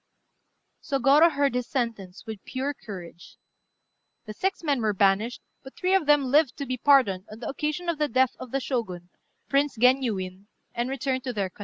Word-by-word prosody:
Sôgorô 280 +4 +4
heard 280 -3 +1
his 250 -1 -2
sentence 225 -8 -4
with 220 -3 -8
pure 270 +2 -3
courage. 175 -8 -11 0.9
The 215 - -7
six 380 - -2
men 285 -5 +1
were 215 -2 0
banished; 200 +5 +1 0.2
but 265 - -13
three 370 +1 +1
of 380 -6 +2
them 295 -1 +5
lived 285 +1 +2
to 280 - -4
be 255 -1 -2
pardoned 245 -9 +3
on 215 - -9
the 230 -1 -7
occasion 305 +5 -3
of 335 -3 -1
the 300 - +2
death 260 -2 +2
of 255 - -8
the 275 - -1
Shogun, 190 -10 -4 0.4
Prince 280 -2 +1
Genyuin, 215 -7 +1 0.3
and 240 +2 -2
returned 265 -1 -2
to 250 - -3
their 195 -4 -2
country. - - -27
255 Hz, 185 wpm, -26 LUFS, 215-285 Hz, 0.9 s, them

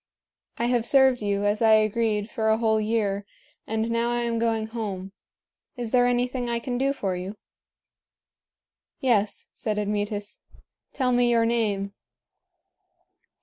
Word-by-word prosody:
I 235 - 0
have 240 -1 +2
served 265 -2 +5
you, 205 -1 0
as 205 +2 +1
I 220 -1 +6
agreed, 215 -1 +2
for 220 -2 -1
a 220 - +4
whole 220 -1 +2
year, 210 -2 0 0.4
and 220 +1 -1
now 230 +1 +1
I 240 0 0
am 235 -1 -1
going 225 -1 0
home. 205 -4 -5 0.7
Is 240 -2 -4
there 245 -1 +4
anything 245 0 0
I 235 - 0
can 245 +1 -3
do 275 +1 +2
for 195 -9 -2
you?" 185 +4 -6 1.6
"Yes," 215 -6 +1
said 215 -2 -3
Admetus; 205 0 -2 0.5
"tell 255 -2 0
me 245 0 +3
your 230 -1 +3
name." 205 -4 0
225 Hz, 145 wpm, -25 LUFS, 210-240 Hz, 1.6 s, I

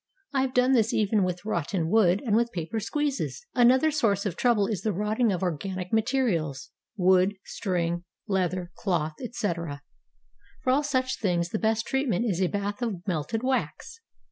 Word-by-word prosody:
I 270 - +2
have 260 -1 -2
done 250 +1 +4
this 225 -4 +3
even 210 0 +2
with 180 +1 -3
rot 170 -8 -1
ten 175 -5 -1
wood 195 +1 +3
and 215 -3 +2
with 235 +1 +2
paper 175 +6 -3
squeezes. 290 - -2
Another 260 +5 +5
source 220 -10 +1
of 195 - -2
trouble 235 -5 +3
is 205 -2 -2
the 220 - 0
rotting 210 +4 +1
of 185 -1 -2
organic 180 +2 -3
materials, 220 - 0 0.3
wood, 185 +1 +4
string, 175 -3 -2 0.2
leather, 185 -2 -1
cloth, 160 -5 -1
etc. 170 - -3 0.8
For 255 - +2
all 275 +3 +3
such 260 -3 -1
things 175 -4 0
the 215 - -2
best 220 0 +1
treatment 260 -6 0
is 190 -3 0
a 185 - +3
bath 205 +3 -3
of 200 -7 -3
melted 185 - -2
wax. 265 - -2
205 Hz, 170 wpm, -27 LUFS, 180-240 Hz, 0.8 s, Another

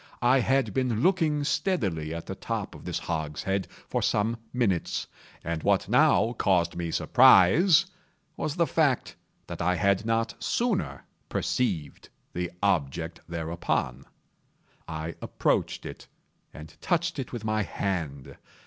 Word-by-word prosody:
I 125 +2 +5
had 130 -4 +1
been 125 -4 0
looking 160 -5 +2
steadily 100 - -1
at 85 0 -5
the - - -5
top - - -4
of - - -12
this 90 -2 -2
hogshead 85 +3 -2 0.2
for - - -1
some 110 +3 +1
minutes, 105 -9 0 0.4
and 85 -1 -3
what - - +2
now 115 - +4
caused 90 -4 +2
me 85 -1 -3
surprise 145 - +6 0.5
was 150 - -3
the 170 -2 +3
fact 150 -6 +1 0.3
that - - -7
I 90 +2 +2
had 100 +1 +2
not 115 +1 0
sooner 235 -6 -1 0.2
perceived 95 - -2 0.2
the 90 0 -3
object 85 -3 0
thereupon. 80 -6 -2 0.8
I 80 0 -5
approached - - -1
it, - - -9 0.4
and 75 +1 -11
touched 170 -3 0
it 130 - -5
with 115 -3 -6
my 110 0 +1
hand. 80 -6 -4
100 Hz, 130 wpm, -27 LUFS, 85-130 Hz, 0.8 s, surprise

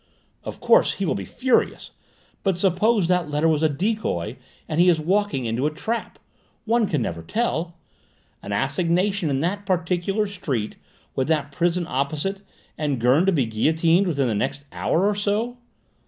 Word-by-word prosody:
Of - - -7
course - - +4
he - - -3
will - - +1
be - - -4
furious, 255 -1 0 0.5
but 190 -3 0
suppose 195 +2 +2
that 180 -3 +1
letter 150 +2 +1
was 155 -2 +2
a 160 - +3
decoy 165 - -2 0.3
and 155 - -2
he 180 +1 +6
is 165 -2 +3
walking 175 -5 0
into 115 +5 0
a - - -1
trap? 225 +9 -4 0.5
One 230 0 +3
never 120 - -2
can - - -18
tell. 175 -7 -1 0.7
An - - -7
assignation 170 - +1
in 135 -1 0
that 200 +4 -2
particular 185 +3 0
street, 140 - -3 0.4
with 130 - 0
that 150 -3 0
prison 175 +3 0
opposite, 150 +9 -2 0.4
and 145 -4 -1
Gurn 130 +10 +3
to - - +5
be 145 -8 +2
guillotined 160 - +2
within 140 -6 +1
the 115 - 0
next 135 +7 -2
hour 180 +4 +1
or 210 - +3
so?" 210 +4 -1
170 Hz, 170 wpm, -23 LUFS, 140-200 Hz, 0.7 s, he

